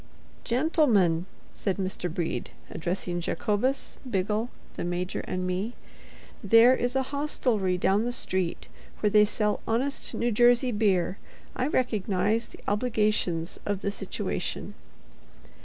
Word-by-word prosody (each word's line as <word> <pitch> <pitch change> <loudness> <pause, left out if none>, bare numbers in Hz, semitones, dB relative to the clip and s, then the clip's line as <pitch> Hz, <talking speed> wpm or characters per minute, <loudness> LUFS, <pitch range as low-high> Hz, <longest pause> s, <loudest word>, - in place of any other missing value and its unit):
"Gentlemen," 235 - +2 0.3
said 195 -2 -2
Mr. 185 -2 -2
Brede, 170 0 -2 0.2
addressing 175 +1 -2
Jacobus, 215 +9 -1
Biggle, 210 +3 0 0.3
the - - -4
Major 175 +1 -2
and 185 0 -2
me, 185 +6 -2 0.7
"there 230 +5 +7
is 245 +1 -1
a 265 - +2
hostelry 240 -10 0
down 195 +4 +2
the 245 - 0
street 185 -7 -2 0.3
where 210 - +2
they 210 0 +6
sell 210 0 0
honest 260 +5 -1
New 240 0 0
Jersey 245 +3 +4
beer. 200 -4 +1 0.4
I 255 - 0
recognize 215 - +1
the - - -14
obligations 210 -6 0
of 205 -1 -2
the 200 - 0
situation." - - -3
210 Hz, 125 wpm, -27 LUFS, 185-240 Hz, 0.7 s, there